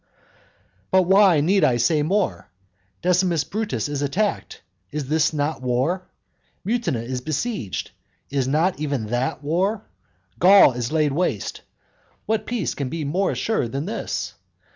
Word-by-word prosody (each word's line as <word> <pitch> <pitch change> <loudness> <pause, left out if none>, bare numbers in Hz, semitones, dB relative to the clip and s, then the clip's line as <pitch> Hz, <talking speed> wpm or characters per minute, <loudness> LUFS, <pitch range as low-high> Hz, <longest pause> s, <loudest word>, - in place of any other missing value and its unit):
But 190 0 +4
why 190 -3 +5
need 190 +4 +3
I 125 -5 +4
say 150 +6 +2
more? 190 +6 -1 0.5
Decimus 180 -3 +2
Brutus 190 - -3
is 145 -1 -3
attacked. 195 +9 -2 0.3
Is 150 -2 -4 0.3
not 150 0 -1
that - - -19
war? 130 +9 -1 0.6
Mutina 215 - -1
is 125 +1 -4
besieged. 155 - -3 0.4
Is 135 -2 0
not 155 +5 +1
even 140 -6 -2
that 130 +3 -1
war? 190 +8 0 0.5
Gaul 195 -5 +7
is 120 +1 -4
laid 155 -2 +2
waste. 175 +6 -2 0.6
What 220 -1 -1
peace 235 -7 -1
can 140 -3 -4
be 165 +1 -4
more 185 +7 0
assured 170 - -1
than 140 +3 -2
this? 215 - -4
155 Hz, 140 wpm, -23 LUFS, 135-190 Hz, 0.6 s, Gaul